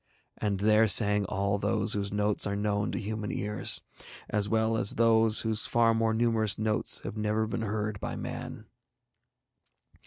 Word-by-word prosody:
And 100 Hz, -2 st, -2 dB
there 110 Hz, +1 st, +4 dB
sang 105 Hz, 0 st, +4 dB
all 100 Hz, +1 st, -1 dB
those 105 Hz, +1 st, 0 dB
whose 100 Hz, -1 st, -2 dB
notes 105 Hz, 0 st, +1 dB
are 100 Hz, -, -2 dB
known 105 Hz, 0 st, -1 dB
to -, -, -4 dB
human 105 Hz, 0 st, -4 dB
ears, 105 Hz, +1 st, 0 dB, 0.5 s
as 105 Hz, -1 st, 0 dB
well 110 Hz, 0 st, +1 dB
as 110 Hz, -2 st, +2 dB
those 115 Hz, -1 st, +3 dB
whose 110 Hz, -3 st, -2 dB
far 115 Hz, -1 st, +3 dB
more 115 Hz, 0 st, +1 dB
numerous 110 Hz, -3 st, +1 dB
notes 110 Hz, 0 st, -1 dB
have -, -, -6 dB
been 110 Hz, -, -5 dB
never 105 Hz, +1 st, 0 dB
heard 105 Hz, -1 st, -3 dB
by -, -, -5 dB
man. -, -, -7 dB
105 Hz, 160 wpm, -28 LUFS, 105-110 Hz, 0.5 s, there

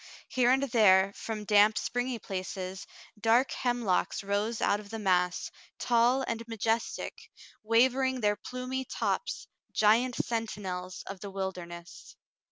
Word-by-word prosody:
Here 245 Hz, -1 st, +2 dB
and 265 Hz, +2 st, +3 dB
there, 200 Hz, -6 st, +4 dB
from 215 Hz, -2 st, -5 dB
damp, 210 Hz, +1 st, +5 dB
spring^^ 245 Hz, -1 st, -2 dB
places, 185 Hz, 0 st, -5 dB, 0.3 s
dark 230 Hz, +5 st, +3 dB
hemlocks 240 Hz, -7 st, 0 dB
rose 205 Hz, +3 st, -1 dB
out 200 Hz, -, +2 dB
of 205 Hz, -1 st, -12 dB
the 225 Hz, -, -5 dB
mass, 180 Hz, -3 st, +1 dB, 0.3 s
tall 245 Hz, +2 st, +3 dB
and 230 Hz, 0 st, -2 dB
majestic, 225 Hz, 0 st, -2 dB, 0.3 s
waving 255 Hz, +3 st, +2 dB
their 210 Hz, -1 st, +2 dB
plumy 255 Hz, +4 st, -4 dB
tops, 365 Hz, -, -2 dB, 0.3 s
giant 230 Hz, +4 st, +3 dB
sentinels 190 Hz, -6 st, -3 dB
of 195 Hz, -1 st, -7 dB
the 200 Hz, -, -7 dB
wilderness. 180 Hz, -3 st, -7 dB
220 Hz, 125 wpm, -29 LUFS, 195-245 Hz, 0.3 s, damp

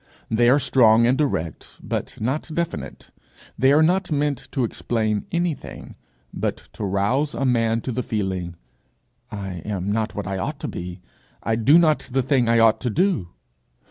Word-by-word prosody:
They 120 Hz, +2 st, +4 dB
are 135 Hz, -, +6 dB
strong 120 Hz, -4 st, +4 dB
and 125 Hz, +2 st, +3 dB
direct 85 Hz, -, -3 dB
but -, -, -5 dB
not 130 Hz, +9 st, -2 dB
definite. 170 Hz, +1 st, -4 dB, 0.4 s
They 130 Hz, +3 st, +3 dB
are 150 Hz, +2 st, +5 dB
not 180 Hz, +2 st, +1 dB
meant 145 Hz, -2 st, -1 dB
to 135 Hz, -, 0 dB
explain 110 Hz, -2 st, -1 dB
anything, 170 Hz, -3 st, -3 dB, 0.4 s
but -, -, -2 dB, 0.2 s
to -, -, -6 dB
rouse 105 Hz, +10 st, 0 dB
a 135 Hz, -, -1 dB
man 115 Hz, -2 st, +2 dB
to 130 Hz, -, -4 dB
the 125 Hz, +2 st, -2 dB
feeling, 95 Hz, -6 st, -3 dB, 0.7 s
'I 95 Hz, -4 st, -6 dB
am 100 Hz, -2 st, -3 dB
not 110 Hz, 0 st, -1 dB
what 105 Hz, -, -4 dB
I 95 Hz, 0 st, -3 dB
ought -, -, -3 dB
to -, -, -3 dB
be, 90 Hz, +1 st, -6 dB, 0.4 s
I 110 Hz, +2 st, +1 dB
do 120 Hz, +8 st, +5 dB
not 155 Hz, -4 st, +2 dB
the 135 Hz, +1 st, +1 dB
thing 130 Hz, -3 st, +2 dB
I 115 Hz, -, +4 dB
ought 115 Hz, -1 st, +4 dB
to 125 Hz, -, -1 dB
do!' 165 Hz, -, +1 dB
115 Hz, 175 wpm, -23 LUFS, 105-140 Hz, 0.7 s, are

